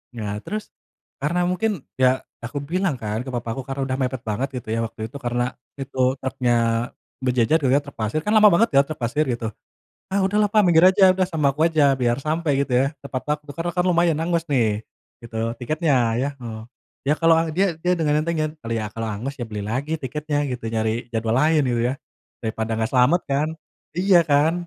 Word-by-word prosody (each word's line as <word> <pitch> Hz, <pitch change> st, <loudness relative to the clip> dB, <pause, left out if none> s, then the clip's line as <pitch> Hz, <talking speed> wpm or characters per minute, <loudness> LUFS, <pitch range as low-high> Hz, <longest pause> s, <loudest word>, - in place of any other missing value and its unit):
Nah 105 Hz, -2 st, -4 dB
terus, 215 Hz, +1 st, -5 dB, 0.6 s
karena 175 Hz, +4 st, +1 dB
mungkin, 185 Hz, +2 st, 0 dB, 0.2 s
ya 130 Hz, 0 st, +3 dB, 0.2 s
aku 125 Hz, +5 st, -4 dB
bilang 170 Hz, +3 st, -1 dB
kan 110 Hz, +2 st, -3 dB
ke 130 Hz, -, -7 dB
papaku 120 Hz, +1 st, -3 dB
karena 135 Hz, +1 st, -5 dB
udah 130 Hz, 0 st, -1 dB
mepet 130 Hz, -1 st, -2 dB
banget, 110 Hz, +6 st, -1 dB
gitu 115 Hz, -, -18 dB
ya, -, -, -1 dB
waktu 115 Hz, 0 st, -7 dB
itu, 140 Hz, -, -9 dB
karena 120 Hz, 0 st, 0 dB, 0.4 s
itu 135 Hz, -1 st, -6 dB, 0.2 s
truknya 130 Hz, -2 st, 0 dB, 0.7 s
berjejer 125 Hz, +4 st, +3 dB
gitu 130 Hz, -, +3 dB
ya, 140 Hz, -, +5 dB
truk 140 Hz, -1 st, -12 dB
pasir. 110 Hz, +6 st, -1 dB
Kan 210 Hz, +1 st, +2 dB
lama 210 Hz, -1 st, +8 dB
banget 215 Hz, +7 st, +4 dB
ya, 140 Hz, -, +8 dB
truk 155 Hz, 0 st, -7 dB
pasir 125 Hz, +6 st, 0 dB
gitu. 115 Hz, -1 st, -3 dB, 0.6 s
"Ah, 195 Hz, +1 st, +2 dB
udahlah 205 Hz, +2 st, +2 dB
Pak 215 Hz, -1 st, +5 dB
minggir 170 Hz, -2 st, +5 dB
aja. 190 Hz, 0 st, +6 dB
Udah 185 Hz, 0 st, +1 dB
sama 155 Hz, -6 st, +1 dB
aku 150 Hz, +4 st, +1 dB
aja" 145 Hz, -4 st, +3 dB
Biar 120 Hz, 0 st, +2 dB
sampai 155 Hz, 0 st, 0 dB
gitu 140 Hz, -, -8 dB
ya, 135 Hz, -, +3 dB, 0.2 s
tepat 135 Hz, -2 st, -4 dB
waktu. 150 Hz, -1 st, -9 dB
Karena 170 Hz, +2 st, -2 dB
kan 180 Hz, -, +2 dB
lumayan 170 Hz, -3 st, +3 dB
hangus 170 Hz, 0 st, 0 dB
nih, 110 Hz, -7 st, +1 dB, 0.4 s
gitu, 115 Hz, 0 st, -3 dB
tiketnya 150 Hz, +3 st, +1 dB, 0.2 s
ya 130 Hz, +4 st, 0 dB
heeh. 115 Hz, -3 st, -7 dB, 0.5 s
Ya 145 Hz, -, +4 dB
kalau 165 Hz, 0 st, +5 dB, 0.2 s
dia 185 Hz, +2 st, +1 dB
dia 180 Hz, -, +1 dB
dengan 150 Hz, -2 st, +2 dB
entengnya, 155 Hz, -2 st, -1 dB, 0.2 s
"ya 115 Hz, -2 st, -1 dB
kalau 115 Hz, 0 st, -3 dB
hangus 120 Hz, +7 st, -4 dB
ya -, -, -2 dB
beli 105 Hz, -1 st, -5 dB
lagi 140 Hz, +9 st, -2 dB
tiketnya" 145 Hz, +2 st, -2 dB
gitu. 120 Hz, -3 st, -4 dB
"Nyari 110 Hz, +2 st, -1 dB
jadwal 115 Hz, 0 st, -1 dB
lain" 155 Hz, +3 st, +4 dB
gitu 120 Hz, -1 st, 0 dB
ya. -, -, -1 dB, 0.5 s
"Daripada 110 Hz, -1 st, -3 dB
nggak 110 Hz, 0 st, -1 dB
selamat 130 Hz, +8 st, +4 dB
kan? 140 Hz, +2 st, +1 dB, 0.5 s
Iya 185 Hz, -1 st, +5 dB
kan?" 150 Hz, +1 st, +3 dB
140 Hz, 200 wpm, -23 LUFS, 120-165 Hz, 0.7 s, lama